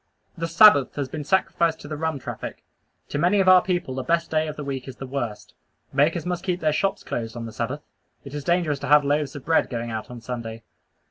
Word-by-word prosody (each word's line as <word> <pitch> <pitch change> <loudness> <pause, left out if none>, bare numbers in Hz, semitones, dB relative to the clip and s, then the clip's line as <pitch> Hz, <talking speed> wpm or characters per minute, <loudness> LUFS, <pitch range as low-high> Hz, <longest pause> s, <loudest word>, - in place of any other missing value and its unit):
The 165 -1 -3
Sabbath 165 -5 +6
has 140 -3 -3
been 150 +2 -5
sacrificed 170 -1 +1
to - - -9
the 155 - -4
rum 160 0 -2
traffic. 135 - -7 0.5
To 145 - -2
many 180 +5 +3
of 190 - +2
our 185 -1 +8
people 175 -8 -2
the 130 - -3
best 170 +5 0
day 155 0 +1
of 155 - -5
the 150 - -6
week 135 -2 -5
is 130 - -7
the 135 - -7
worst. 115 -6 -5 0.4
Bakers 155 +3 +2
must 180 -1 -2
keep 180 -2 -1
their 155 -3 +1
shops 195 +5 0
closed 115 0 -4
on 115 - -5
the 115 - -8
Sabbath. 130 +5 -3 0.4
It 140 - -9
is 145 -1 -4
dangerous 170 -4 +1
to - - -5
have 150 -1 +6
loaves 145 -1 0
of 140 - -8
bread 165 0 +2
going 120 -2 -4
out 110 -1 -5
on 125 -1 -8
Sunday. 115 -1 -6
145 Hz, 240 wpm, -24 LUFS, 130-170 Hz, 0.5 s, our